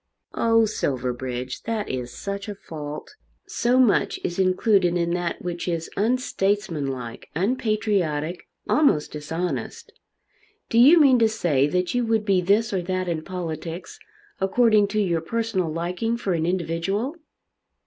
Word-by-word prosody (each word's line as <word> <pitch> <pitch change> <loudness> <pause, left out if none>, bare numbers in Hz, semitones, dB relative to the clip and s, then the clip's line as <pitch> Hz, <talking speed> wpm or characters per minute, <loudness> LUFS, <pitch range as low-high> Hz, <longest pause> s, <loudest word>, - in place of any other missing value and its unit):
"Oh, 225 -1 +3
Silverbridge, 125 - -3
that 220 -2 -2
is 125 -1 -4
such 200 - -5
a 205 - -5
fault! 150 -5 -8 0.3
So 245 +2 +1
much 250 -5 +3
is 175 - -3
included 185 -1 +3
in 170 0 0
that 175 -1 -2
which 175 0 -4
is 165 -2 -2
unstatesmanlike, 195 - -1
unpatriotic, 195 - 0 0.2
almost 275 - +3
dishonest! 150 -3 -4 0.8
Do 230 - +3
you 295 +8 +8
mean 270 -5 +6
to 225 -1 +4
say 155 -11 +1
that 180 +3 -1
you 245 0 +1
would 225 -2 +1
be 195 -3 +3
this 205 +4 +2
or 190 - 0
that 185 +1 -2
in 165 -2 -1
politics 170 -1 -6 0.4
according 210 +1 +4
to 215 +2 -1
your 175 -5 +1
personal 200 -3 -1
liking 180 +8 -2
for 195 -5 -1
an 165 -1 0
individual?" 190 - -1
185 Hz, 140 wpm, -24 LUFS, 165-220 Hz, 0.8 s, you